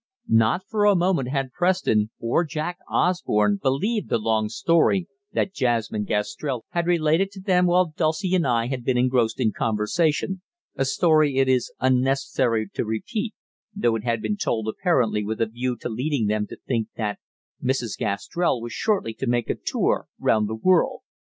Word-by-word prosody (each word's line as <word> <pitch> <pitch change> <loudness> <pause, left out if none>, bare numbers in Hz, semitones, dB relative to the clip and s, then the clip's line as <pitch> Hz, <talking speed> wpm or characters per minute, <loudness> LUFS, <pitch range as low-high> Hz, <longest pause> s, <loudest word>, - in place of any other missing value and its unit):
Not 115 +11 +3
for 210 -2 +1
a 205 -1 +5
moment 175 -7 +1
had 135 -1 -2
Preston, 175 - +1
or 115 +9 +1
Jack 160 +2 -4
Osborne, 105 - +1
believed 200 - 0
the - - +2
long 110 -1 0
story 165 - +2 0.3
that 195 - 0
Jasmine 115 - 0
Gastrell 115 +5 -2
had 170 0 -1
related 170 +2 +2
to 195 - -9
them 180 -2 +2
while 175 -2 +2
Dulcie 170 +3 0
and 175 -6 +2
I 115 -2 +2
had 125 0 -4
been 125 0 +1
engrossed 125 -3 +1
in 110 - +2
conversation, 155 - 0 0.3
a 135 - 0
story 150 0 +3
it 135 0 +3
is 130 -2 +1
unnecessary 130 -3 +1
to - - -1
repeat, 205 - -3 0.4
though 120 - +1
it 110 - -4
had 115 -2 -1
been 210 - -1
told 110 - -1
apparently 115 - +1
with 110 +2 -4
a 115 - +3
view 120 +3 -3
to - - -3
leading 125 +2 -1
them 105 0 0
to - - -10
think 115 -4 0
that 105 -2 -3 0.4
Mrs. 125 -4 -1
Gastrell 125 - -1
was 120 0 -6
shortly 195 - 0
to 130 - -5
make 120 -1 +1
a - - -2
tour - - -1
round 105 -1 +2
the 110 - -3
world. 180 +9 +2
130 Hz, 175 wpm, -24 LUFS, 115-175 Hz, 0.4 s, a